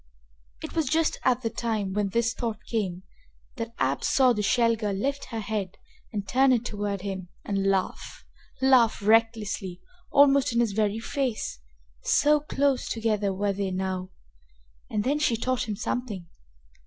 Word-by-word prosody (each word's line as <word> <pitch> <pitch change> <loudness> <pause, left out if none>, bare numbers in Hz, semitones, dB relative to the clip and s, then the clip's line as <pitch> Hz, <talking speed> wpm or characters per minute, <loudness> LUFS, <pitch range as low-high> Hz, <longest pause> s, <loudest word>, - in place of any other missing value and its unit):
It - - -6
was 320 -4 +1
just 320 +3 +1
at 255 -1 +2
the 225 - -1
time 215 -5 -2
when 205 -1 0
this 235 +3 +1
thought 230 -4 -3
came 190 -5 -2 0.5
that 230 0 -5
Ab 135 +1 0
saw 260 -2 +4
the 210 - -1
Shell 230 +2 +3
girl 210 -2 -2
lift 275 +8 -2
her 225 -2 -5
head 200 -3 -3 0.3
and 205 -2 -4
turn 260 +6 +4
it 240 -2 +2
toward 205 -3 -3
him 190 -2 -5 0.2
and 195 -1 0
laugh 190 -1 -2 0.4
laugh 245 -5 +4
recklessly, 215 -4 +1 0.3
almost 280 -3 +5
in 235 - +2
his 235 -3 +2
very 210 +1 0
face, 245 - -2 0.4
so 300 +1 +4
close 280 -2 0
together 215 -3 0
were 200 +1 0
they 195 0 -2
now. 185 0 -3 0.8
And 210 -1 -1
then 285 +5 +1
she 245 -6 +2
taught 250 0 -1
him 210 - -1
something! 220 -4 -3
220 Hz, 160 wpm, -27 LUFS, 200-250 Hz, 0.8 s, almost